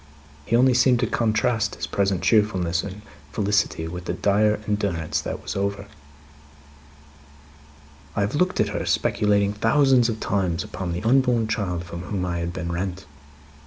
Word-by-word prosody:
He 115 - +2
only 125 +2 +5
seemed 125 0 +4
to - - +3
contrast 110 -1 0
his - - -4
present 95 -2 0
cheerfulness 95 -5 +2
and 100 +1 -8 0.3
felicity 100 -4 0
with 90 +1 -7
the - - -2
dire 105 +1 +2
endurance 100 -6 -1
that - - -5
was - - -5
over. 100 0 -2 2.3
"I - - 0
have 100 +3 -1
looked 180 +5 +1
at 105 - +2
her, 105 - -3
speculating 100 -1 +1
thousands 125 +2 +3
of 110 -1 -3
times 95 -6 -1
upon 90 -2 -5
the 90 - -4
unborn 120 -1 +3
child 95 -6 -2
from 85 0 -7
whom 90 0 -3
I 85 -1 -2
had 85 0 -3
been 85 -1 -4
rent. 90 +1 -4
100 Hz, 160 wpm, -23 LUFS, 90-110 Hz, 2.3 s, only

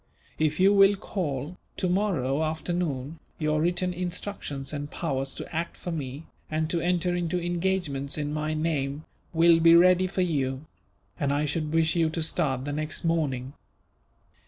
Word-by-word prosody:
If 155 +1 +1
you 195 +2 +6
will 195 0 +6
call, 170 -5 -4 0.2
tomorrow 180 -8 +1
afternoon, 160 -2 -2 0.2
your 155 -1 +1
written 180 +2 +1
instructions 175 -6 -4
and 145 0 -4
powers 135 -5 -2
to - - -8
act 165 +1 -3
for 175 - -5
me, 145 -1 -5 0.2
and 155 0 -1
to 170 - 0
enter 175 +1 +1
into 175 0 -1
engagements 175 -6 -1
in 150 0 -2
my 155 0 -1
name, 155 -2 -1 0.3
will 165 0 +5
be 165 0 +7
ready 180 +1 +6
for 185 0 -1
you; 140 -4 -1 0.5
and 140 -3 +1
I 145 +1 +1
should 150 +1 -2
wish 160 0 +2
you 165 -2 +3
to 160 0 -2
start 135 -5 0
the 145 - -3
next 155 +1 -3
morning. 140 -6 0
160 Hz, 160 wpm, -27 LUFS, 145-175 Hz, 0.5 s, be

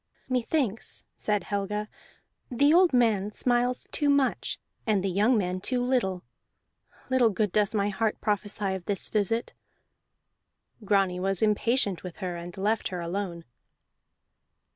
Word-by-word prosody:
"Methinks," 250 -2 -1
said 210 -3 0
Helga, 205 +2 -2 0.6
"the 285 +5 +4
old 360 0 +6
man 220 -6 +2
smiles 245 +3 0
too 295 -2 +1
much 280 -2 +1 0.3
and 205 -4 +2
the 195 - 0
young 215 +6 +3
man 185 -2 -1
too 250 +5 0
little. 245 -8 0 0.9
Little 255 -3 +4
good 205 -1 0
does 210 +1 +1
my 205 0 +1
heart 215 +2 -1
prophesy 205 -1 -1
of 185 -2 -6
this 200 -3 -2
visit." 220 +2 0 1.3
Grani 195 -3 +2
was 195 +1 0
impatient 210 -2 +2
with 180 -3 -8
her 180 -3 -4
and 170 +2 -8
left 210 +3 0
her 180 - -5
alone. 170 -1 -4
210 Hz, 135 wpm, -27 LUFS, 190-240 Hz, 1.3 s, old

